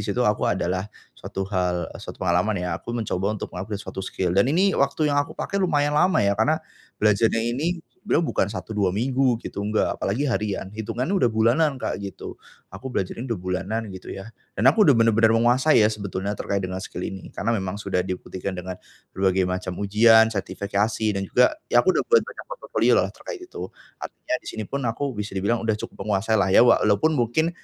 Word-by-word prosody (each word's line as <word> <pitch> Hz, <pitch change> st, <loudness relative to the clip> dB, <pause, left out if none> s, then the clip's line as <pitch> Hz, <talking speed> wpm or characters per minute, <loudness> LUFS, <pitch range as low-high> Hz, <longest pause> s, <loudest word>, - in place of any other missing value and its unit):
situ -, -, -1 dB
aku -, -, +1 dB
ada -, -, 0 dB
lah 95 Hz, +1 st, -1 dB, 0.3 s
suatu 95 Hz, -, -5 dB
hal 90 Hz, -2 st, -1 dB
eee, -, -, -10 dB
satu -, -, -8 dB
pengalaman 90 Hz, +4 st, +2 dB
ya 90 Hz, -, -2 dB
aku 120 Hz, -, -4 dB
mencoba 105 Hz, -2 st, -1 dB
untuk -, -, -7 dB
meng-upgrade 100 Hz, +3 st, -5 dB
suatu -, -, -6 dB
skill 90 Hz, -2 st, -2 dB
dan 100 Hz, +7 st, +3 dB
ini 185 Hz, +7 st, +3 dB
waktu 145 Hz, +1 st, +1 dB
yang 145 Hz, -, +3 dB
aku 145 Hz, -, -5 dB
pakai 200 Hz, -, -2 dB
lumayan 145 Hz, -5 st, +1 dB
lama 150 Hz, -, +3 dB
ya 100 Hz, -, +3 dB
karena 110 Hz, +10 st, +2 dB, 0.4 s
belajarnya 110 Hz, +2 st, +2 dB
ini 165 Hz, +6 st, -2 dB, 0.2 s
beliau 165 Hz, -, +1 dB
bukan 100 Hz, -, 0 dB
1 110 Hz, +1 st, -6 dB
2 105 Hz, -3 st, +1 dB
minggu 130 Hz, +1 st, +2 dB
gitu -, -, -5 dB
enggak 105 Hz, +1 st, 0 dB
apalagi 110 Hz, +9 st, -2 dB
harian 105 Hz, -7 st, -2 dB
hitungannya 115 Hz, -, -3 dB
sudah 120 Hz, -, +4 dB
bulanan 120 Hz, +7 st, +2 dB
Kak 115 Hz, -, -3 dB
gitu. 100 Hz, -1 st, -8 dB, 0.3 s
Aku 130 Hz, -, -7 dB
belajar 95 Hz, -8 st, -2 dB
ini 130 Hz, -, -5 dB
sudah 115 Hz, -, -1 dB
bulanan 95 Hz, +4 st, -3 dB
gitu 95 Hz, -1 st, -10 dB
ya 100 Hz, +4 st, -8 dB, 0.2 s
dan 105 Hz, -, 0 dB
aku 210 Hz, +6 st, +4 dB
sudah 140 Hz, -, +7 dB
benar-benar 115 Hz, 0 st, +4 dB
menguasai 120 Hz, +2 st, +4 dB
ya -, -, +5 dB
sebetulnya 100 Hz, -1 st, -4 dB
terkait 100 Hz, -1 st, -2 dB
dengan 95 Hz, 0 st, -4 dB
skill 90 Hz, -1 st, -6 dB
ini 95 Hz, -1 st, -6 dB
karena 115 Hz, -, -2 dB
memang 95 Hz, -3 st, -2 dB
sudah 100 Hz, -3 st, -1 dB
dibuktikan 95 Hz, +1 st, -5 dB
dengan 90 Hz, +1 st, -6 dB, 0.4 s
berbagai 95 Hz, 0 st, +1 dB
macam 90 Hz, 0 st, -3 dB
ujian, 110 Hz, +2 st, +5 dB
sertifikasi 100 Hz, +2 st, -1 dB
dan 100 Hz, -1 st, -2 dB
juga 125 Hz, -, +4 dB, 0.2 s
ya -, -, +5 dB
aku -, -, +5 dB
sudah -, -, 0 dB
buat 465 Hz, 0 st, +5 dB
banyak -, -, -10 dB
portfolio -, -, 0 dB
lah -, -, +2 dB
terkait 455 Hz, -6 st, -8 dB
itu 360 Hz, -, -7 dB, 0.3 s
artinya 310 Hz, -, -5 dB
di -, -, -20 dB
sini 110 Hz, -, -4 dB
pun 140 Hz, -, -4 dB
aku 125 Hz, +5 st, -2 dB
bisa 105 Hz, -3 st, -5 dB
dibilang 100 Hz, +5 st, 0 dB
sudah 110 Hz, -, +2 dB
cukup 105 Hz, -1 st, -7 dB
menguasai 110 Hz, +2 st, +1 dB
lah, 95 Hz, -, +3 dB
ya -, -, +8 dB
walaupun 115 Hz, +3 st, +4 dB
mungkin 125 Hz, +8 st, +1 dB
110 Hz, 205 wpm, -24 LUFS, 95-125 Hz, 0.4 s, ya